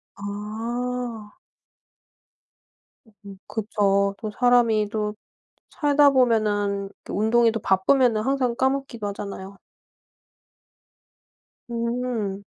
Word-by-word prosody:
아. 225 +2 -5 1.9
음 200 -1 -10
그쵸. 200 -2 +1
또 215 -2 -5
사람이 230 -3 +3
또 210 -1 -2 0.5
살다 290 -2 +4
보면은 210 -6 +1
그 - - -8
운동이 230 +3 +3
또 225 - -3
바쁘면은 220 +4 +3
항상 255 0 0
까먹기도 265 -4 -1
하잖아요. 200 -1 -7 2.1
음. 235 -4 -2
220 Hz, 160 characters per minute, -24 LUFS, 205-245 Hz, 2.1 s, 살다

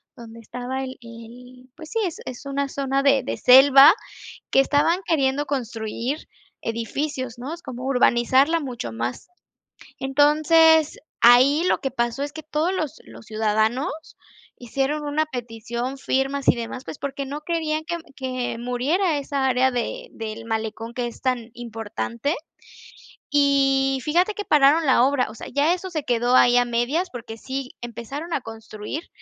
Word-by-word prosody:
donde 230 -2 -12
estaba 250 +3 -5
el 260 0 -7
el 245 +2 -13
pues, 315 -2 -11
sí, 455 - -2
es 340 - -4
es 255 +2 -8
una 280 0 -2
zona 275 0 -1
de 275 -2 +3
de - - -4
selva 275 +5 +8 0.5
que - - +3
estaban 295 +6 +2
queriendo 285 -2 +1
construir 240 0 -4 0.3
edificios, 250 +2 -3
¿no?, 265 +6 -6
es 340 - -9
como 255 -1 -7
urbanizarla 265 +4 +3
mucho 250 - -5
más, 120 - -5 0.7
entonces, 305 +3 +4 0.2
ahí 255 +7 +6
lo - - +1
que 270 - -1
pasó 240 +1 -2
es 290 +1 -4
que 315 0 -8
todos 310 +4 -1
los 315 -7 -3
los - - -14
ciudadanos 220 +4 0 0.7
hicieron 275 +5 -2
una 300 +2 0
petición, 240 0 -5
firmas 270 +1 -1
y - - +6
demás, 235 +2 -6
pues, - - -8
porque 275 0 -4
no 290 +3 -6
querían 315 -2 -2
que 340 +1 -3 0.2
que 255 -2 -3
muriera 285 +8 0
esa 280 -1 -1
área 260 0 +3
de - - -4
del 225 0 -7
malecón 225 +1 -4
que 245 -1 -2
es 235 - -12
tan 250 -3 -2
importante, 230 +3 -4 1.0
y 270 -2 +3
fíjate 355 +7 +2
que 415 - -5
pararon 300 +2 +4
la 260 -3 +4
obra, 270 -1 +2
o - - -13
sea, - - -9
ya 295 +5 +3
eso 370 +1 -5
se 315 -4 -3
quedó 245 0 +1
ahí 245 -1 +6
a 245 - +4
medias, 240 +10 -1
porque 230 -2 -8
sí 265 +2 -5
empezaron 240 +8 -6
a - - 0
construir 225 +6 -8
265 Hz, 160 wpm, -23 LUFS, 240-290 Hz, 1.0 s, selva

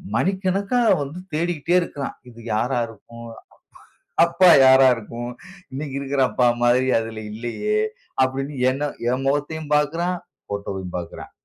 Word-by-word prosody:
மணிக்கணக்கா 195 - 0 0.2
வந்து 150 +6 -7
தேடிக்கிட்டே 170 +1 0
இருக்கான். 145 -5 -5
இது 115 -1 -15 0.2
யாரா 120 +3 0
இருக்கும்? 115 +2 -12 1.0
அப்பா 170 +2 +4 0.2
யாரா 130 0 +7
இருக்கும்? 120 +2 -7 0.4
இன்னைக்கு 140 0 -5
இருக்கிற 140 0 -1
அப்பா 125 -1 +2 0.2
மாதிரி 125 +2 +3
அதில 110 -1 -6
இல்லையே! 120 - -2 0.4
அப்டினு 135 +2 -2 0.2
என்ன 145 +2 -2 0.2
என் 130 +1 -1
முகத்தையும் 145 +2 -2
பாக்குறான்; 170 +5 0 0.3
போட்டோவயும் 95 -3 -5
பாக்குறான். 85 -1 -8
135 Hz, 120 wpm, -22 LUFS, 120-165 Hz, 1.0 s, யாரா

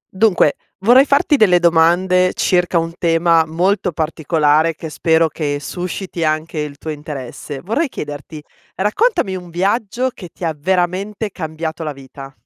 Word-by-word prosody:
Dunque, 190 -7 +3 0.3
vorrei 245 +7 +6
farti 285 +1 +3
delle 195 -7 +5
domande 175 +2 +3
circa 180 -1 +1
un 165 0 -1
tema 165 -1 +3
molto 180 +4 0
particolare 155 0 +1
che 160 0 -8
spero 160 +1 +2
che 150 -2 -3
susciti 180 +2 -5
anche 155 +1 -1
il 150 -1 -5
tuo 155 - -6
interesse. 145 -2 -7
Vorrei 270 - -1
chiederti, 145 - -7 0.4
raccontami 210 - +1
un 180 -1 -8
viaggio 210 +8 -1
che 180 -5 -10
ti 175 - -6
ha 160 - 0
veramente 190 +6 -1
cambiato 160 -1 -5
la 150 -2 -4
vita. 135 0 -11
170 Hz, 145 wpm, -18 LUFS, 155-190 Hz, 0.4 s, vorrei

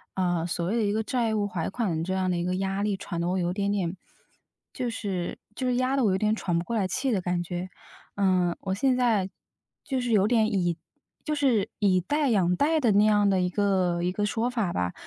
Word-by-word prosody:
呃， 175 -3 0
所 170 0 -2
谓 220 +6 0
的 225 - +1
一 205 0 +1
个 220 +1 0
债 230 -1 0
务 205 -1 0
还款 180 -1 -2
这 190 - -2
样 185 -1 0
的 175 - 0
一 175 - -1
个 180 0 -1
压 195 +1 -1
力， 205 -1 0
喘 175 -3 -5
的 170 - -1
我 185 - 0
有 175 -1 0
点 200 +1 -1
点， 185 -2 -1 0.8
就 250 -2 -2
是 195 -6 -3 0.2
就 255 +4 -3
是 250 - +1
压 255 +2 +1
得 255 - +3
我 195 - +3
有 185 - +2
点 215 +2 +1
喘 175 -6 -1
不 170 - -1
过 235 - -3
来 190 -3 +1
气 260 +7 -1
的 205 - +1
感 175 -1 -1
觉。 175 +2 -5 0.5
嗯， 185 -3 +2
我 190 -1 -2
现 255 +6 +2
在 225 -7 +2 0.5
就 265 -2 -2
是 245 -2 -2
有 205 -1 +4
点， 225 -2 +3
以 175 -3 0 0.5
就 305 - -2
是 260 -8 +2
以 190 -3 +3
贷 290 - 0
养 180 -5 +2
贷 315 +2 +2
的 235 -5 +3
那 205 - +5
样 205 -1 +4
的 190 -1 +2
一 180 - +1
个 185 -3 +1
一 180 - +1
个 205 +2 -1
说 225 +3 0
法 225 -8 -1
吧。 90 0 -1
200 Hz, 265 characters per minute, -27 LUFS, 180-225 Hz, 0.8 s, 那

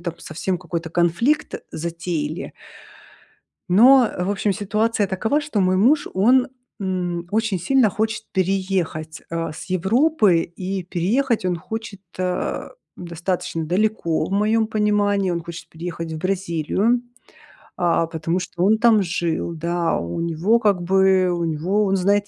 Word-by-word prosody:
там 170 -1 -4
совсем 175 +3 -3
какой-то 170 -2 -5
конфликт 175 - +1 0.2
затеяли 165 -1 -4 1.2
но, 245 +6 +6
в 180 +2 -1
общем, 205 0 0
ситуация 215 +1 0
такова, 220 +10 0
что 295 -9 -2
мой 185 0 +2
муж, 260 +10 +3
он, 245 +7 +4 0.3
м, 180 -3 -2
очень 220 -3 +1
сильно 235 +5 +3
хочет 220 +2 -2
переехать, 185 -4 -1
а, 165 -1 -3
с - - -8
Европы 210 - +3
и 185 +2 -5
переехать 215 +7 0
он 180 -1 0
хочет, 210 +2 -7 0.2
а, 180 -1 -2 0.3
достаточно 170 -1 -3
далеко 180 -3 0
в - - -6
моем 215 +2 +2
понимании. 205 -3 +1
Он 170 -1 -2
хочет 170 0 -9
переехать 165 0 -6
в 160 - -4
Бразилию, 190 +5 0 0.8
а, 170 -1 +2
потому 165 +2 -2
что 175 -1 -4
он 210 +3 +4
там 225 -2 +5
жил, 170 -1 -2
да. 170 +1 -1
У 85 - -4
него, 170 +8 +2
как 205 -5 +2
бы, 190 0 +3
у 175 -1 -1
него 170 +6 0
Он 195 0 +1
знает 200 +2 +2
185 Hz, 140 wpm, -22 LUFS, 170-210 Hz, 1.2 s, но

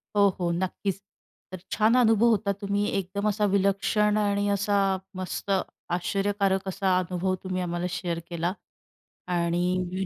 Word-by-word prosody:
हो, 200 0 +6
हो, 170 -1 0
नक्कीच. 190 +2 -2 0.5
तर 185 - -6
छान 220 +3 +3
अनुभव 225 -2 +4
होता. 205 -2 +2
तुम्ही 200 0 0
एकदम 195 +2 -2
असा 210 0 +1
विलक्षण 200 +2 +2
आणि 205 -1 +1
असा 200 0 +1 0.4
मस्त, 185 +2 -4 0.4
आश्चर्यकारक 195 +2 0
असा 190 -1 +1
अनुभव 185 +1 -1
तुम्ही 185 -1 -2
आम्हाला 175 0 -2
शेअर 175 -2 -3
केला 170 +2 -1 0.8
आणि 180 +2 0
195 Hz, 130 wpm, -26 LUFS, 180-205 Hz, 0.8 s, हो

